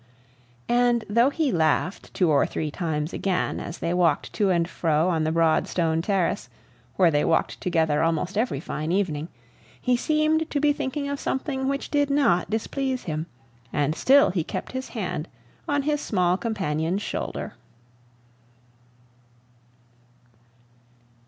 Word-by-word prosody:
And 240 -1 +2
though 235 +5 +4
he 295 -2 0
laughed 165 +2 0
two 175 -4 +3
or 140 -2 +3
three 155 -1 -3
times 155 -2 -2
again, 190 -2 -1
as 170 - -6
they 170 - -2
walked 170 -4 +1
to 205 -3 +1
and 170 -2 +2
fro 160 -1 +1
on 160 -3 +1
the 155 - +1
broad 165 -1 +2
stone 165 -2 0
terrace, 190 -1 0 0.5
where 180 -3 +4
they 145 -1 +2
walked 165 - 0
together 160 -4 +1
almost 165 +3 0
every 215 - 0
fine 155 +1 -4
evening, 165 -5 0 0.5
he 250 - +2
seemed 310 +4 +1
to 290 - -1
be 295 0 +3
thinking 285 0 -3
of 280 0 -3
something 265 0 -2
which 275 0 -2
did 290 -1 +2
not 280 -13 +2
displease 260 +4 -2
him, 155 0 -3 0.4
and 145 +1 +1
still 275 - +5
he 175 -3 -1
kept - - -5
his 260 0 -5
hand 180 -5 -3 0.4
on 285 -1 +1
his 295 0 0
small 180 -1 +1
companion's 185 -4 -2
shoulder. - - -4
185 Hz, 145 wpm, -25 LUFS, 160-265 Hz, 0.5 s, still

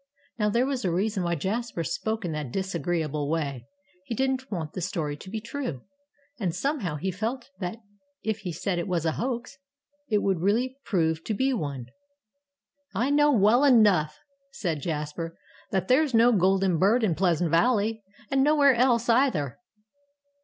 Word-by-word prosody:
Now, 210 0 +2
there 235 +4 +2
was 270 -2 -2
a 185 - +1
reason 200 +3 0
why 170 -1 0
Jasper 200 +2 -2
spoke 220 +6 -2
in 170 - -2
that 150 -5 -4
disagreeable 165 -5 -2
way. 140 -7 -2 0.4
He 230 - -4
didn't 265 +1 -1
want 160 -6 -4
the 185 - -4
story 160 -5 -2
to 190 - -11
be 220 +2 -3
true. 225 - -5 0.6
And, 180 -6 -1
somehow, 225 - -1
he 190 +6 -2
felt 235 +8 -4
that 180 +2 -4 0.5
if 220 0 -1
he 190 -3 -5
said 175 +3 -2
it 170 - -3
was 175 -3 -1
a 160 - +2
hoax, 245 - -4 0.5
it 210 -2 +2
would 190 -3 +1
really 230 +8 +1
prove 160 -5 0
to 215 - -1
be 265 +4 +1
one. 140 - -3 1.1
"I 245 +8 +1
know 295 0 +4
well 230 +2 +4
enough," 205 - +4 0.4
said 170 - -2
Jasper, 160 +2 -4 0.3
"that 190 -2 -1
there's 265 0 +3
no 235 +2 +6
golden 190 -3 +2
bird 220 +7 +3
in 195 -6 +2
Pleasant 170 -1 +1
Valley 220 +4 +2 0.3
and 270 -1 +3
nowhere 290 -2 +5
else, 240 -1 +2
either!" 230 - +2
195 Hz, 165 wpm, -26 LUFS, 165-240 Hz, 1.1 s, no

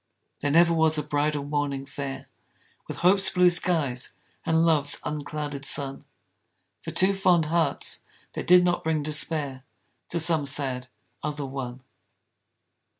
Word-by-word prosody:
There 145 - -1
never 170 +3 +4
was 160 -1 +2
a 150 - -1
bridal 145 0 -1
morning 145 -1 -3
fair 135 -1 -7 0.6
With - - -7
hope's 195 +2 +5
blue 180 -1 +4
skies 155 -8 0 0.3
and 160 0 +2
love's 150 -3 +3
unclouded 150 -1 -5
sun 140 -1 +1 0.8
For - - -7
two 190 +1 +2
fond 180 -4 +2
hearts, 160 -2 0 0.3
that - - -6
did 180 0 +6
not 175 0 0
bring 160 -2 -1
despair 150 -3 -1 0.5
To 170 - -1
some 160 -3 +3
sad 130 -2 0 0.4
other 150 -1 -4
one. 130 -2 -7
150 Hz, 135 wpm, -25 LUFS, 140-165 Hz, 0.8 s, did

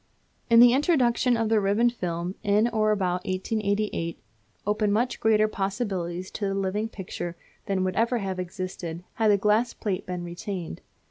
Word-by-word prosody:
The 235 +1 +8
introduction 255 -4 +3
of 225 -1 0
the 225 -1 +4
ribbon 210 +4 +2
film 175 -5 -3
in 210 +2 +3
or 215 -2 +1
about 180 -3 0
1888 200 -2 -1 0.5
opened 210 0 +1
much 240 +4 0
greater 215 -1 +4
possibilities 195 -4 -3
to 205 - -3
the 195 - -1
living 195 +3 -1
picture 175 -4 -6 0.3
than 195 -2 0
would 185 0 -1
ever 235 +2 +2
have 190 -4 -3
existed 180 -2 -5 0.2
had 220 - +5
the 205 - +5
glass 215 +4 +2
plate 195 -4 -3
been 180 -1 -4
retained. 175 - -6
205 Hz, 155 wpm, -26 LUFS, 185-225 Hz, 0.5 s, The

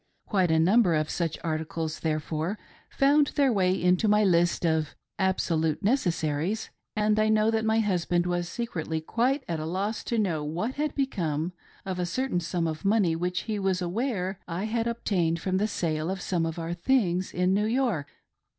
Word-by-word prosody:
Quite 190 -4 +1
a 160 - +3
number 185 +1 +4
of 155 0 0
such 165 -3 -2
articles, 160 0 -3
therefore, 160 +4 -2 0.3
found 285 +1 +4
their 275 -4 +3
way 185 -2 +2
into 180 +5 +3
my 210 0 +4
list 175 -2 +2
of 160 -2 0 0.2
"absolute 165 -4 0
necessaries," 180 - 0 0.2
and 215 0 +2
I 215 0 +3
know 215 0 +3
that 220 -1 0
my 220 +1 +3
husband 175 -4 +1
was 175 -1 -1
secretly 165 -8 -3
quite 250 - 0
at 165 -2 -2
a 155 - -4
loss 200 +6 -2
to 235 - -1
know 175 -8 0
what 175 - -2
had 300 +2 -2
become 175 - -1 0.3
of 185 -1 -3
a 180 - 0
certain 255 0 -1
sum 170 0 -2
of 155 +1 -3
money 195 -5 +3
which 180 +2 -1
he 215 -2 -3
was 190 -2 +1
aware 190 0 -2
I 175 +2 -3
had 225 +1 -1
ob 235 0 -4
tained 170 -5 +1
from 185 +2 -1
the 210 +2 +1
sale 160 -5 -2
of 190 0 -2
some 175 -2 -1
of 165 +1 -5
our 165 0 -3
things 185 -2 +1
in 180 +1 +1
New 210 +2 +2
York. 230 - 0
180 Hz, 185 wpm, -27 LUFS, 165-215 Hz, 0.3 s, number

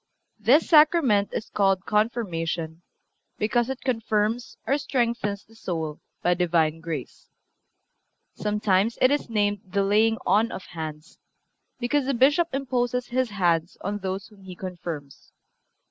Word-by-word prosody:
This 250 +9 +4
Sacrament 300 - +5
is - - -5
called 195 -1 +2
Confirmation, 175 -7 -1 0.6
because 230 +3 +1
it 265 -1 -4
confirms 225 -1 -1
or 280 +2 +1
strengthens 235 -7 -1
the 225 - -21
soul 160 -8 -4 0.2
by 180 - +4
Divine 165 -3 +1
grace. 160 -6 -6 1.0
Sometimes 210 0 +1
it 255 - +5
is 290 -3 0
named 205 -2 +1
the 195 0 -1
laying 220 +3 +3
on 220 +3 +3
of 190 - -7
hands, 155 -1 -8 0.6
because 260 +2 0
the 275 - +1
Bishop 285 +7 +4
imposes 250 -2 -1
his 255 0 0
hands 175 -4 0
on 205 +2 -3
those 190 0 -4
whom 210 -2 -19
he 185 -1 -10
confirms. 170 -6 -7
210 Hz, 130 wpm, -25 LUFS, 180-240 Hz, 1.0 s, Sacrament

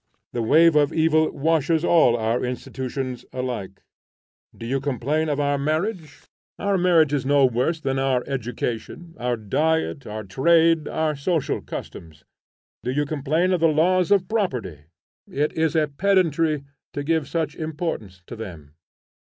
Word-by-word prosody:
The 120 - -1
wave 160 +8 +5
of 145 0 +4
evil 155 -1 +3
washes 160 +2 +1
all 140 -9 +4
our 115 +2 0
institutions 130 0 -4
alike. 120 -7 -5 0.7
Do 115 - -8
you 135 +3 -1
complain 145 +3 -1
of 145 -1 -1
our 145 -1 +1
Marriage? 155 +2 -2 0.3
Our 200 0 0
marriage 170 -5 +3
is 140 -3 0
no 140 0 +4
worse 130 +7 0
than 135 -3 -1
our 130 -2 +1
education, 125 +5 -4
our 120 0 -1
diet, 150 +7 -1
our 110 +1 -5
trade, 160 - +3
our 155 -1 -1
social 155 +2 -1
customs. 80 -2 -9 0.6
Do - - -4
you 145 +3 0
complain 155 +5 0
of 180 - +1
the 165 - +4
laws 175 +3 +2
of 195 -3 +3
Property? 125 - -2 0.4
It 150 +2 -1
is 160 0 0
a 155 -1 +3
pedantry 160 -2 +1 0.3
to 145 - -3
give 160 -1 0
such 155 0 -2
importance 155 - -5
to 120 - -8
them. 85 -10 -9
145 Hz, 150 wpm, -23 LUFS, 125-160 Hz, 0.7 s, wave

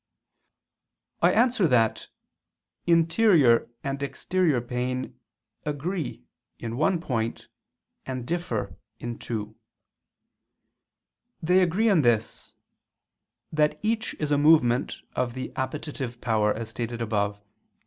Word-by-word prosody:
I - - +5
answer 235 -5 +3
that, 115 -5 +2 0.8
Interior 165 - +4
and 140 0 -3
exterior 155 0 0
pain 125 +1 -3 0.4
agree 150 - -3 0.3
in 115 0 -5
one 170 +6 +2
point 115 -8 -3 0.6
and 130 -2 -4
differ 170 -8 -3 0.2
in 120 -1 -6
two. 110 -2 -4 1.8
They 180 +3 +3
agree 185 +6 +2
in 195 -7 +5
this, 115 -4 0 1.0
that 150 -1 +2
each 220 0 -1
is 150 -1 -3
a 145 - +3
movement 145 -5 +3
of 125 -1 -1
the 130 - -5
appetitive 130 -2 -4
power, 110 -3 +2
as 110 +1 -4
stated 115 +1 -4
above 105 -3 0
(A. 105 - -34
130 Hz, 105 wpm, -26 LUFS, 115-165 Hz, 1.8 s, I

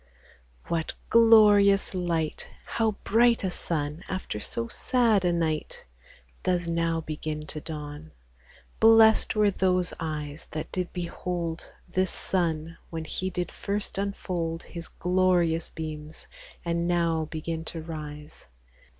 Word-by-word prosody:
What 165 -1 -2 0.2
glorious 210 -4 +6
light! 170 -4 -1 0.2
How 225 -1 0
bright 235 +1 +4
a 190 - 0
Sun 155 -1 -2
after 185 - -3
so 115 +2 -3
sad 230 - +2
a 175 - +3
night 160 -3 -2 0.6
Does 175 -1 0
now 165 -1 0
begin 155 -1 -5
to 155 0 -5
dawn! 150 0 -7 0.7
Bless'd 225 0 +6
were 210 -1 +4
those 185 -2 +1
eyes 155 -2 -5
That 155 0 -5
did 180 -1 -2
behold 170 -1 -4 0.2
This 185 0 0
Sun, 165 -3 -1
when 160 -1 -5
He 185 +3 -2
did 180 -1 -3
first 200 -1 -3
unfold 175 -4 -3
His 170 -2 -7
glorious 180 -2 +1
beams, 155 -1 -7 0.4
and 170 0 0
now 170 -2 +1
begin 160 +1 -4
to 165 - -5
rise. 150 - -8
170 Hz, 125 wpm, -27 LUFS, 160-185 Hz, 0.7 s, glorious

